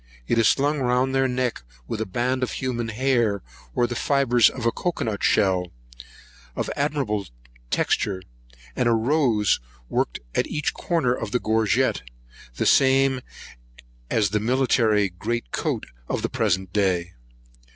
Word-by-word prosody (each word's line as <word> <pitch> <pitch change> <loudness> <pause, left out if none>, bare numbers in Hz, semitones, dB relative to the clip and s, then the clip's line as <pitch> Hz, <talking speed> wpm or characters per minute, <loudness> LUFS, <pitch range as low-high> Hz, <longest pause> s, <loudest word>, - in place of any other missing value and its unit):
It 115 - +2
is 115 - +5
slung 145 +2 +2
round 125 +1 +1
their 135 0 +3
neck 125 - -1 0.3
with 110 - -3
a 110 - -2
band 125 +6 -1
of 125 - -1
human 120 -3 -2
hair, 115 -3 +1 0.3
or 120 - +3
the 120 - -3
fibres 125 -2 +3
of 125 - -7
cocoa 175 -1 -2
nut 110 -3 -3
shell, 95 -4 +2 0.8
of - - -2
admirable 140 -9 -1 0.4
texture, 95 - 0 0.5
and 120 - +2
a - - +4
rose 115 -3 +2 0.3
worked - - -1
at - - +1
each 150 -1 -2
corner 160 -9 0
of 115 -3 -4
the 125 - 0
gorget, 110 -1 +1 0.5
the - - -1
same 135 -1 +4 0.9
as 105 -4 +1
the 105 - +1
military 110 -4 +2
jemmy 120 +2 -1 0.7
of - - -2
the - - 0
present 95 0 0
day. 90 -4 +1
120 Hz, 140 wpm, -24 LUFS, 105-130 Hz, 0.9 s, is